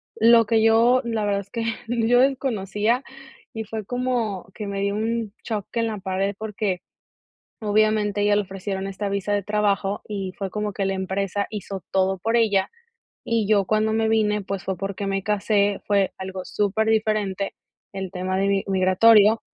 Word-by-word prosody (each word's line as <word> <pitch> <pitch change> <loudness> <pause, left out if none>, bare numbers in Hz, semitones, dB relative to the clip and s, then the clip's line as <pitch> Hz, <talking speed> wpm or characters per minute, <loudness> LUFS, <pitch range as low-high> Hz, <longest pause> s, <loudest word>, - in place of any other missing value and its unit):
Lo 230 +1 +6
que 220 0 +2
yo, 230 +3 +5
la 225 -3 -1
verdad 200 -1 0
es 200 - -16
que 230 -1 -3 0.2
yo 240 +1 +3
desconocía 240 -3 0 0.5
y 220 -1 -4
fue 220 0 -5
como 245 -5 -2
que 210 - -5
me 200 0 -3
dio 200 0 0
un 220 -1 -2
choque 220 +1 -3
en 230 - 0
la 215 - -3
pared, 195 +1 -2
porque 210 -3 -2 0.8
obviamente 210 -1 +2
a - - +2
ella 205 0 +3
le 210 - +2
ofrecieron 195 0 -5
esta 195 +1 -4
visa 200 +1 -2
de 205 0 +1
trabajo 205 -1 0
y 195 -3 -4
fue 195 - -2
como 210 +2 -3
que 195 0 -2
la 195 - 0
empresa 195 +1 -2
hizo 200 -2 -6
todo 190 0 +1
por 225 +5 0
ella. 205 -4 +2 0.5
Y 225 -3 0
yo 205 -2 +4
cuando 215 +2 +1
me 220 0 +1
vine, 210 -1 +2
pues 195 0 -5
fue 190 - -1
porque 195 0 -4
me 195 -1 -1
casé, 205 -1 +1
fue 200 -2 +2
algo 190 0 -5
superdiferente 210 -1 0 0.4
el 190 -2 -5
tema 185 +1 -2
de 195 - +1
mi 195 -1 +1
migratorio. 200 +3 +5
205 Hz, 180 wpm, -23 LUFS, 195-220 Hz, 0.8 s, Lo